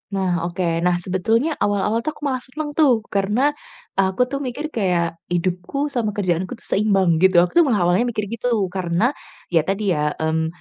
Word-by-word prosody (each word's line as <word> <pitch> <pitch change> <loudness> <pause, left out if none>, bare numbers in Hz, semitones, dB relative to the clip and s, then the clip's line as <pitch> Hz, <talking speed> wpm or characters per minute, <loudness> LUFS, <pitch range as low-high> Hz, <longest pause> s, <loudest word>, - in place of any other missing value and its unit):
Nah, 180 -3 0
oke, 175 +1 -3 0.2
nah 175 +1 +2
sebetulnya 225 - +1
awal-awal 205 +2 +1
tuh 305 +6 -4
aku - - -15
malah 260 -3 0
seneng 295 +4 -6
tuh, 265 -8 +3
karena, 210 +9 +2 0.5
aku 190 +5 +2
tuh 275 - -2
mikir 285 +4 -4
kayak, 175 -5 0
hidupku 180 +11 -2
sama 220 -6 -1
kerjaanku 185 +2 -1
tuh - - -17
seimbang 195 -5 +2
gitu. 190 +1 +4
Aku 180 - -2
tuh - - +7
malah 210 -8 +2
awalnya 180 +8 +2
mikir 215 -3 -2
gitu 230 +1 -3 0.2
karena 185 +6 0 0.4
ya 165 -2 +3
tadi 195 +1 0
ya, 150 -2 0
mmm, 160 0 0
195 Hz, 180 wpm, -21 LUFS, 175-245 Hz, 0.5 s, tuh